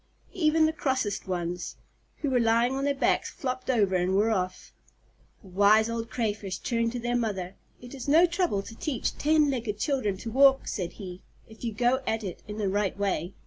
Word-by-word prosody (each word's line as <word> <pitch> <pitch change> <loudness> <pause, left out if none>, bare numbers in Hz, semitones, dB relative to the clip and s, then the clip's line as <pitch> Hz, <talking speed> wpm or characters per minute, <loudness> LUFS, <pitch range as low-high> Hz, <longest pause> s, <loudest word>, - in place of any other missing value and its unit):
Even 320 -2 +3
the 315 - +1
crossest 260 -10 -1
ones, 175 -1 -3 0.5
who 285 - +1
were 250 - +3
lying 235 +2 +3
on 270 +1 -1
their 285 0 +1
backs - - +1
flopped 255 -4 -5
over 205 -7 +2
and 180 +1 +1
were 215 +3 +3
off. 185 -3 -3 0.7
The 195 - -14
Wise 210 +4 +4
Old 230 0 -4
Crayfish 205 -6 -2
turned 230 0 -1
to 245 - -3
their 240 +1 -1
mother. 195 -6 -2 0.3
"It 245 +1 -11
is 270 -1 -7
no 320 +5 +6
trouble 345 - 0
to 225 - -10
teach 265 -1 -2
ten 300 -1 +3
legged 230 -5 -3
children 215 -5 -1
to 225 +4 -6
walk," 270 +2 +5
said 180 -5 -3
he, 185 -2 -9 0.3
"if 220 +1 -15
you 235 - -1
go 245 +5 +1
at 225 0 -1
it 185 -3 -6
in 210 0 -6
the 210 -2 -1
right 200 0 0
way." 195 -3 -2
225 Hz, 200 wpm, -27 LUFS, 200-265 Hz, 0.7 s, no